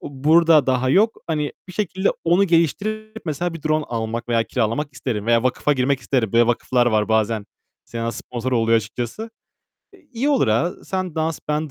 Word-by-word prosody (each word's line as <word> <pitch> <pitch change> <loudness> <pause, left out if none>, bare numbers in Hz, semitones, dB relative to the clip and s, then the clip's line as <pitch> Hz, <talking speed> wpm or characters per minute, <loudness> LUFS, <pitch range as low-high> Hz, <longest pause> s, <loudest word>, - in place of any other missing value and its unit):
o - - -7 0.2
burada 165 -2 +5
daha 130 0 +1
yok. 215 +9 +2
Hani, 150 -3 -2 0.2
bir - - -8
şekilde 190 -1 -1 0.2
onu 175 +4 +4
geliştirip 215 - -1
mesela 165 +2 -2
bir 165 - -9
drone 155 -1 +1
almak 115 0 -4
veya 115 -1 +2
kiralamak 125 +6 -2
isterim 115 -5 -4
veya 115 0 +3
vakfa 130 +3 +1
girmek 135 0 0
isterim. 120 -4 -1
Böyle 115 0 +4
vakıflar 120 +1 +1
var 110 -2 +1
bazen 110 -1 +1 0.4
sena 115 0 -4
sponsor 125 +1 -5
oluyor 115 -1 +3
açıkçası. 120 - -4 0.6
E, 390 - -18
iyi 250 +5 -1
olur, 270 - +2
ha, 150 +12 +1
sen 185 -3 -3
dans; 160 0 -1
ben 150 0 -1
140 Hz, 180 wpm, -21 LUFS, 115-170 Hz, 0.6 s, burada